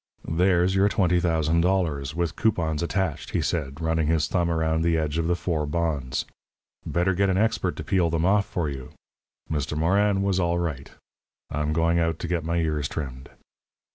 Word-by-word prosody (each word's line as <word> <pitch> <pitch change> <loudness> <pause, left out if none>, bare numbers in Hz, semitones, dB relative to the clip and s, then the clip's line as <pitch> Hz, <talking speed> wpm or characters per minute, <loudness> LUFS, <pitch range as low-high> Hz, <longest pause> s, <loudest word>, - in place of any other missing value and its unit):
"There's 90 +2 +2
your 95 +1 +3
twenty 90 -4 +2
thousand 85 -1 +1
dollars, 80 -6 0
with 85 -1 -1
coupons 85 -8 0
attached," 90 -2 -2
he - - +1
said, 70 -4 -2
running 80 -1 0
his 80 -1 +2
thumb 85 -2 0
around 80 -1 +1
the 85 0 +2
edge 80 0 -1
of 80 - 0
the 90 - +2
four 80 -4 -2
bonds. 75 -5 -1 0.6
"Better 90 +2 0
get 100 +2 +2
an 95 - +1
expert 110 +2 +1
to - - -6
peel 90 -3 +1
them 80 +1 0
off 100 +2 +3
for 85 -3 -2
you. 65 -3 -7 0.5
Mister 75 -1 -2
Morin 100 +5 +2
was 95 -2 +1
all 85 -1 +1
right. 75 -6 -3 0.6
I'm 75 +1 -1
going 85 +2 +2
out 80 -1 0
to 85 - -5
get 85 -2 -1
my 85 +2 -1
ears 75 -4 0
trimmed." 65 -4 -6
85 Hz, 185 wpm, -25 LUFS, 80-90 Hz, 0.6 s, your